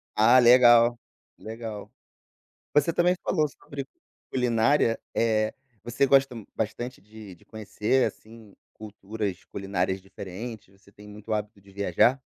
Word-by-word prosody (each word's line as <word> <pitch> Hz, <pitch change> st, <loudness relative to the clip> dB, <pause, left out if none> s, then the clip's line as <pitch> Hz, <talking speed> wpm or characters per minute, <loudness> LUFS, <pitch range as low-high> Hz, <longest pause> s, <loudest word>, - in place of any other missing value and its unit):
Ah, 120 Hz, +4 st, +6 dB
legal! 120 Hz, -1 st, +6 dB, 0.4 s
Legal. 110 Hz, -2 st, -8 dB, 0.8 s
Você 150 Hz, +3 st, +3 dB
também 180 Hz, +1 st, +2 dB
falou 155 Hz, -4 st, +1 dB
sobre 140 Hz, +1 st, -9 dB, 0.5 s
"culinária", 120 Hz, 0 st, +2 dB, 0.2 s
eh, 110 Hz, -1 st, +1 dB, 0.3 s
você 120 Hz, +4 st, +1 dB
gosta 135 Hz, -2 st, +3 dB, 0.2 s
bastante 115 Hz, +2 st, -4 dB
de 105 Hz, -2 st, -13 dB
de -, -, -24 dB
conhecer, 110 Hz, +4 st, -1 dB
assim, 110 Hz, -2 st, -10 dB, 0.2 s
culturas 105 Hz, -2 st, -6 dB
culinárias 95 Hz, -1 st, -3 dB
diferentes, 100 Hz, +1 st, -9 dB
você 100 Hz, -, -22 dB
tem 105 Hz, 0 st, -15 dB
muito 105 Hz, +1 st, -7 dB
hábito 105 Hz, -1 st, -4 dB
de 100 Hz, 0 st, -19 dB
viajar? 100 Hz, +7 st, +2 dB
110 Hz, 120 wpm, -26 LUFS, 100-125 Hz, 0.8 s, Ah